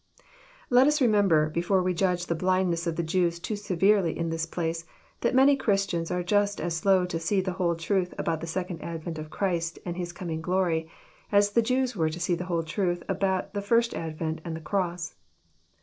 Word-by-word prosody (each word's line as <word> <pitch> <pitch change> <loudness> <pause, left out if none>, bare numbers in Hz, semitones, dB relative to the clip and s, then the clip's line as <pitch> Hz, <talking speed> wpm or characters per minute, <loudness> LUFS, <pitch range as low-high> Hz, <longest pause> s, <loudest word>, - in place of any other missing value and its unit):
Let 250 +2 +6
us 300 +1 +3
remember, 200 - +3
before 180 +3 +1
we 180 0 +1
judge 180 0 0
the 170 - -1
blindness 180 -1 +1
of 165 - -1
the 170 - -1
Jews 170 +1 +1
too 210 +5 -4
severely 195 -2 +2
in 165 0 -2
this 165 0 -2
place, 165 0 -3 0.4
that 240 +2 0
many 275 +2 +6
Christians 195 -9 0
are 180 0 -1
Just 205 +2 +1
its 175 - -2
slow 185 +2 +3
to 170 -2 -3
see 190 +4 +1
the 185 0 -1
whole 175 -2 0
truth 180 +2 0
about 165 -1 -1
the 165 - -5
second 180 0 -4
advent 165 -1 -5
of 155 0 -7
Christ 170 -2 -1
and 175 -1 -3
His 175 -1 -4
coming 170 -2 -5
glory, 170 -2 0 0.4
as 205 0 +4
the 235 - +4
Jews 255 +1 0
were 160 -4 +1
to 160 +2 -6
see 175 +1 0
the 175 +1 -2
whole 170 -2 -1
truth 175 +2 -1
about 195 0 -1
the 205 - -2
first 230 +3 +2
advent 160 0 -4
and 165 -1 -4
the - - -5
cross. 175 0 -2
180 Hz, 205 wpm, -27 LUFS, 165-200 Hz, 0.4 s, Let